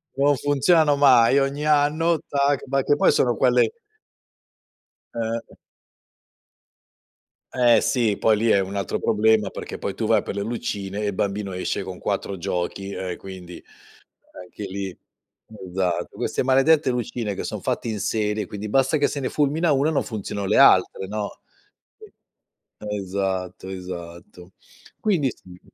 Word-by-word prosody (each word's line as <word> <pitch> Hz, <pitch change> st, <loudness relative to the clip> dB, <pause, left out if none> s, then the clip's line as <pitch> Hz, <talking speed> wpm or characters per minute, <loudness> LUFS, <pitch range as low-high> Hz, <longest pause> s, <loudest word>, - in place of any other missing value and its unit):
Non 140 Hz, +1 st, +3 dB
funzionano 145 Hz, +2 st, +3 dB
mai 135 Hz, -1 st, +6 dB
ogni 140 Hz, +2 st, -1 dB
anno, 155 Hz, +2 st, +2 dB
tac! 140 Hz, -1 st, +1 dB
Ma 135 Hz, +1 st, +1 dB
che 145 Hz, -, +3 dB
poi -, -, +4 dB
sono 450 Hz, +1 st, +2 dB
quelle 465 Hz, -2 st, +3 dB, 1.5 s
Eh. 115 Hz, 0 st, -4 dB, 2.0 s
Eh 120 Hz, -3 st, +5 dB
sì, 115 Hz, -6 st, +1 dB
poi 110 Hz, -1 st, +3 dB
lì 115 Hz, +2 st, 0 dB
è 100 Hz, -, +5 dB
un 95 Hz, +1 st, -4 dB
altro 100 Hz, -3 st, -2 dB
problema 110 Hz, -1 st, +2 dB
perché -, -, -7 dB
poi -, -, -4 dB
tu -, -, -3 dB
vai -, -, +3 dB
per -, -, -5 dB
le 100 Hz, -, -2 dB
lucine 100 Hz, -3 st, -4 dB
e 105 Hz, -, -1 dB
il 100 Hz, -, -2 dB
bambino 100 Hz, 0 st, -2 dB
esce 90 Hz, +2 st, -2 dB
con 95 Hz, -1 st, -7 dB
4 100 Hz, -1 st, -3 dB
giochi 95 Hz, +2 st, -3 dB
e 95 Hz, -2 st, -4 dB
quindi 90 Hz, -2 st, -10 dB, 0.9 s
anche 90 Hz, +3 st, -9 dB
lì 95 Hz, -1 st, -5 dB, 0.8 s
esatto, 90 Hz, -2 st, -1 dB
queste -, -, -1 dB
maledette 135 Hz, +3 st, +3 dB
lucine 120 Hz, -3 st, -3 dB
che -, -, -5 dB
son -, -, -5 dB
fatte -, -, -2 dB
in 110 Hz, -2 st, -3 dB
serie, 105 Hz, 0 st, -1 dB
quindi 105 Hz, +3 st, -6 dB
basta 135 Hz, +6 st, +2 dB
che 145 Hz, -, +2 dB
se 145 Hz, -, -4 dB
ne 130 Hz, -, -2 dB
fulmina 150 Hz, +3 st, +1 dB
1 140 Hz, +2 st, +2 dB
e -, -, +1 dB
non 150 Hz, -, +1 dB
funzionano 100 Hz, -2 st, -5 dB
le -, -, +2 dB
altre, 95 Hz, -, +5 dB
no 105 Hz, 0 st, -5 dB, 1.4 s
sì, 105 Hz, -1 st, -4 dB
esatto 95 Hz, -2 st, -3 dB
esatto. 90 Hz, -1 st, -9 dB, 0.5 s
Quindi 175 Hz, -11 st, +1 dB
si. 90 Hz, -4 st, -15 dB
110 Hz, 150 wpm, -23 LUFS, 95-140 Hz, 2.0 s, mai